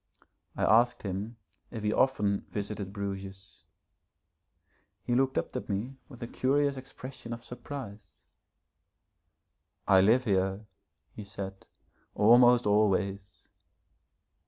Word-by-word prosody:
I -, -, -1 dB
asked 120 Hz, +2 st, +4 dB
him 100 Hz, +4 st, -4 dB, 0.3 s
if 110 Hz, -3 st, -7 dB
he 105 Hz, 0 st, +1 dB
often 105 Hz, -7 st, +1 dB
visited 100 Hz, -1 st, -4 dB
Bruges. 95 Hz, -3 st, -7 dB, 1.4 s
He 120 Hz, -, -1 dB
looked 130 Hz, +1 st, +2 dB
up -, -, -2 dB
at 125 Hz, -, -5 dB
me 115 Hz, +7 st, -3 dB
with 125 Hz, -3 st, -10 dB
a -, -, -4 dB
curious 140 Hz, +3 st, +1 dB
expression 130 Hz, -2 st, -8 dB
of 115 Hz, 0 st, -8 dB
surprise. 125 Hz, -4 st, -8 dB, 1.8 s
'I 95 Hz, -1 st, +6 dB
live 115 Hz, +6 st, +4 dB
here,' 95 Hz, 0 st, 0 dB, 0.5 s
he 105 Hz, -, -8 dB
said, 95 Hz, -1 st, -8 dB, 0.5 s
'almost 120 Hz, +3 st, +6 dB
always.' 100 Hz, -1 st, 0 dB
105 Hz, 110 wpm, -29 LUFS, 100-125 Hz, 1.8 s, I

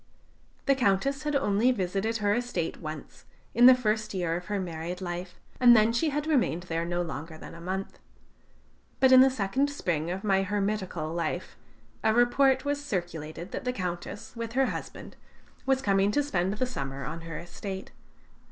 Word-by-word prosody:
The 275 Hz, -, +5 dB
Countess 265 Hz, +3 st, +1 dB
had 295 Hz, -1 st, 0 dB
only 235 Hz, -2 st, +3 dB
visited 200 Hz, +1 st, -1 dB
her 205 Hz, -2 st, +1 dB
estate 240 Hz, -8 st, -2 dB
once, 155 Hz, -2 st, -8 dB, 0.3 s
in 240 Hz, +2 st, +7 dB
the 255 Hz, -, +9 dB
first 215 Hz, -4 st, -1 dB
year 175 Hz, -3 st, 0 dB
of 175 Hz, +1 st, -5 dB
her 205 Hz, +1 st, -2 dB
married 170 Hz, 0 st, -4 dB
life, 180 Hz, 0 st, -5 dB, 0.2 s
and 240 Hz, -2 st, +8 dB
then 220 Hz, +2 st, +4 dB
she 270 Hz, +7 st, +1 dB
had 295 Hz, +1 st, -2 dB
remained 245 Hz, -, +1 dB
there 165 Hz, -2 st, -2 dB
no 175 Hz, 0 st, -1 dB
longer 160 Hz, 0 st, -6 dB
than -, -, -10 dB
a 170 Hz, -, -11 dB
month. 190 Hz, +2 st, -4 dB, 1.0 s
But 265 Hz, -1 st, +5 dB
in 260 Hz, 0 st, +9 dB
the 265 Hz, -, +7 dB
second 260 Hz, +4 st, 0 dB
spring 170 Hz, -, -2 dB
of 185 Hz, +2 st, -4 dB
my 195 Hz, -2 st, +2 dB
hermitical 195 Hz, -5 st, -2 dB
life 170 Hz, -5 st, -3 dB, 0.5 s
a 220 Hz, 0 st, +3 dB
report 260 Hz, +3 st, +4 dB
was 285 Hz, 0 st, -1 dB
circulated 175 Hz, -, -4 dB
that -, -, -4 dB
the 250 Hz, -, 0 dB
Countess, 190 Hz, +3 st, -5 dB
with 230 Hz, -1 st, -5 dB
her 265 Hz, +1 st, +3 dB
husband, -, -, -6 dB, 0.5 s
was 265 Hz, 0 st, +2 dB
coming 195 Hz, 0 st, +3 dB
to 290 Hz, -, +2 dB
spend 190 Hz, -7 st, 0 dB
the 255 Hz, -, 0 dB
summer 140 Hz, -, -5 dB
on 160 Hz, +4 st, -5 dB
her 165 Hz, -1 st, -6 dB
estate. 190 Hz, +3 st, -7 dB
200 Hz, 180 wpm, -28 LUFS, 175-250 Hz, 1.0 s, the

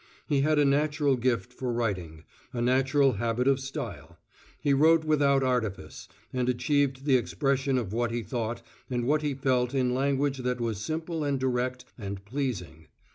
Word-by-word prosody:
He 145 Hz, -3 st, +1 dB
had 155 Hz, +2 st, +2 dB
a 145 Hz, -, +4 dB
natural 145 Hz, 0 st, +2 dB
gift 120 Hz, -6 st, -1 dB
for 125 Hz, -2 st, -3 dB
writing 90 Hz, -9 st, -3 dB, 0.3 s
a 120 Hz, -, -3 dB
natural 130 Hz, +3 st, +3 dB
habit 120 Hz, +2 st, 0 dB
of 135 Hz, -1 st, +4 dB
style; 135 Hz, 0 st, -6 dB, 0.4 s
he 140 Hz, -, +2 dB
wrote 160 Hz, +3 st, +5 dB
without 140 Hz, -3 st, +3 dB
artifice, 120 Hz, -6 st, -2 dB, 0.3 s
and 125 Hz, -1 st, 0 dB
achieved 135 Hz, +2 st, +1 dB
the 135 Hz, -3 st, +5 dB
expression 135 Hz, +1 st, 0 dB
of 110 Hz, -5 st, -3 dB
what 120 Hz, 0 st, 0 dB
he 115 Hz, 0 st, -3 dB
thought 115 Hz, +2 st, -3 dB, 0.3 s
and 120 Hz, -2 st, -1 dB
what 150 Hz, +4 st, +2 dB
he 145 Hz, -2 st, -1 dB
felt 130 Hz, -1 st, +1 dB
in 125 Hz, -2 st, +2 dB
language 140 Hz, +1 st, 0 dB
that 125 Hz, 0 st, -1 dB
was 115 Hz, -4 st, -2 dB
simple 160 Hz, +5 st, -3 dB
and 140 Hz, -2 st, 0 dB
direct 125 Hz, 0 st, -1 dB
and 100 Hz, -2 st, -6 dB
pleasing. 105 Hz, -, -4 dB
130 Hz, 170 wpm, -28 LUFS, 120-140 Hz, 0.4 s, wrote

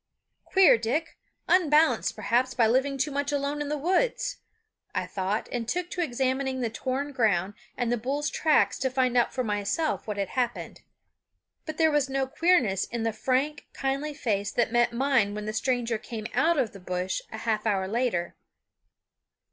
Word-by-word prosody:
"Queer 380 Hz, -, +5 dB
Dick! 265 Hz, +9 st, -2 dB, 0.3 s
unbalanced, 320 Hz, -3 st, +3 dB
perhaps, 255 Hz, +2 st, 0 dB
by 235 Hz, -, +4 dB
living 265 Hz, +5 st, +2 dB
too 280 Hz, +3 st, 0 dB
much 285 Hz, +1 st, -1 dB
alone 285 Hz, +1 st, -1 dB
in 290 Hz, -, -3 dB
the 300 Hz, -, -1 dB
woods," 380 Hz, -, 0 dB, 0.6 s
I 185 Hz, -1 st, 0 dB
thought, 190 Hz, +3 st, -2 dB
and 235 Hz, -2 st, -3 dB
took 355 Hz, +4 st, -2 dB
to 360 Hz, -, -2 dB
examining 265 Hz, -2 st, -1 dB
the 230 Hz, -2 st, -1 dB
torn 265 Hz, +5 st, -3 dB
ground 205 Hz, -7 st, +1 dB, 0.2 s
and 245 Hz, -2 st, 0 dB
the 240 Hz, -, +1 dB
bull's 280 Hz, +5 st, -2 dB
tracks 310 Hz, -2 st, +2 dB
to 260 Hz, -, 0 dB
find 255 Hz, -1 st, +1 dB
out 240 Hz, -, +3 dB
for 255 Hz, -, -2 dB
myself 210 Hz, +10 st, -1 dB
what 210 Hz, -1 st, -3 dB
had 195 Hz, -2 st, -2 dB
happened. 245 Hz, -2 st, -3 dB, 0.9 s
But 310 Hz, 0 st, -5 dB
there 320 Hz, -1 st, +4 dB
was 295 Hz, -2 st, +1 dB
no 270 Hz, 0 st, 0 dB
queerness 275 Hz, -, +2 dB
in 235 Hz, -1 st, -4 dB
the 225 Hz, -1 st, 0 dB
frank, 265 Hz, +6 st, -1 dB
kindly 275 Hz, +2 st, -2 dB
face 205 Hz, -6 st, -1 dB
that 235 Hz, -2 st, +1 dB
met 240 Hz, 0 st, +3 dB
mine 235 Hz, -5 st, +1 dB
when 210 Hz, 0 st, -5 dB
the 215 Hz, -, -3 dB
stranger 235 Hz, -1 st, 0 dB
came 220 Hz, -1 st, -7 dB
out 335 Hz, 0 st, +3 dB
of 245 Hz, -6 st, 0 dB
the 195 Hz, -, -10 dB
bush 180 Hz, 0 st, -3 dB
a 220 Hz, -, -6 dB
half 220 Hz, -1 st, -1 dB
hour 195 Hz, -3 st, +1 dB
later. 215 Hz, -6 st, -1 dB
255 Hz, 180 wpm, -27 LUFS, 220-285 Hz, 0.9 s, Queer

